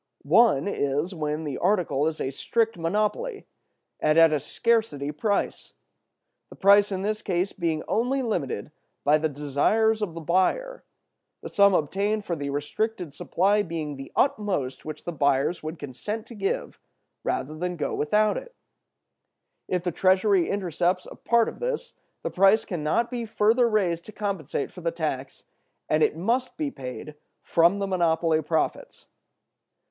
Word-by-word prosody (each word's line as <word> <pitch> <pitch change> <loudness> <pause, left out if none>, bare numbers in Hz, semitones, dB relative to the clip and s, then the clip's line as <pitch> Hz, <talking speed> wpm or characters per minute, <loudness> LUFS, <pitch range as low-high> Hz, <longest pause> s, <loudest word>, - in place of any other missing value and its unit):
One 170 - +4
is, 145 0 -1
when 150 -1 -3
the 145 -4 -4
article 170 -7 +1
is 160 -1 -3
a 135 - -2
strict 225 - 0
monopoly, 210 - -1 0.5
and 155 +1 +2
at 165 -1 +7
a 150 - +2
scarcity 215 - 0
price. 200 +7 -2 0.8
The - - -12
price 200 +1 +5
in 190 0 -2
this 215 +1 -1
case 185 +1 -1
being 165 -4 -1
only 260 +4 0
limited 150 - -2 0.3
by 150 +2 +4
the 155 +1 0
desires 150 +11 +1
of 180 -6 -3
the - - -5
buyer—the 190 - -3
sum 200 -1 +5
obtained 200 +7 0
for 170 - -2
the 145 -2 -4
restricted 165 +4 -3
supply 200 +7 +1
being 160 -6 -4
the 135 0 -9
utmost 200 - 0
which 155 -1 -7
the 175 - -4
buyers 140 +1 +1
would 155 +2 -6
consent 205 - -5
to 240 - -11
give 195 -3 -3 0.4
rather 155 +4 -2
than 180 +2 -3
go 160 - -2
without 210 +8 +2
it—if 480 - -10
the 180 - -1
treasury 190 +1 +3
intercepts 180 -1 0
a - - -10
part 235 -1 +2
of - - -6
this, - - -3 0.3
the - - -2
price 195 +4 +4
can 175 -4 -4
not 235 +11 +1
be 240 -1 -3
further 225 +2 +3
raised 180 -6 0
to - - -10
compensate 195 -10 -3
for 180 - -11
the 170 - 0
tax, 150 -5 -4 0.4
and 155 - +2
it 155 - +2
must 240 +8 -1
be 295 -2 -2
paid 130 - -7 0.3
from 170 +4 +3
the 200 - -1
monopoly 165 -3 +2
profits. 160 +1 -2
180 Hz, 155 wpm, -26 LUFS, 155-215 Hz, 0.8 s, at